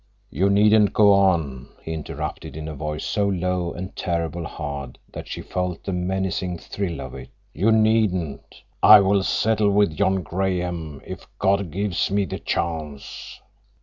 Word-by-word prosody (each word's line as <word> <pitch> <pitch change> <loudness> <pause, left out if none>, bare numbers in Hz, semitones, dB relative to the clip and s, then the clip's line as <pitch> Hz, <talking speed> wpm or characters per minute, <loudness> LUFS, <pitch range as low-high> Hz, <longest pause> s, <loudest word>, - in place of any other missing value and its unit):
"You 95 +2 +2
needn't 105 +1 +4
go 105 -1 +6
on," 85 -10 +2 0.2
he 80 - -4
interrupted 80 0 -6
in 80 0 -6
a 80 - -5
voice 75 +1 -4
so 100 -1 0
low 90 -2 -1
and 90 +2 -7
terribly 85 0 -2
hard 70 -5 -6 0.2
that - - -7
she - - -6
felt 90 -2 -3
the 95 - -3
menacing 90 0 -2
thrill 90 0 -4
of - - -7
it. - - -9 0.2
"You 100 +8 +2
needn't. 110 -8 +1 0.2
I 105 0 +10
will 100 0 +3
settle 105 +2 +2
with 100 -5 +2
John 95 +3 +1
Graham, 90 -5 -2
if - - -8
God 100 -1 +1
gives 100 +2 -1
me 100 0 +1
the 85 - -5
chance." 75 -4 -4
90 Hz, 155 wpm, -23 LUFS, 80-100 Hz, 0.2 s, I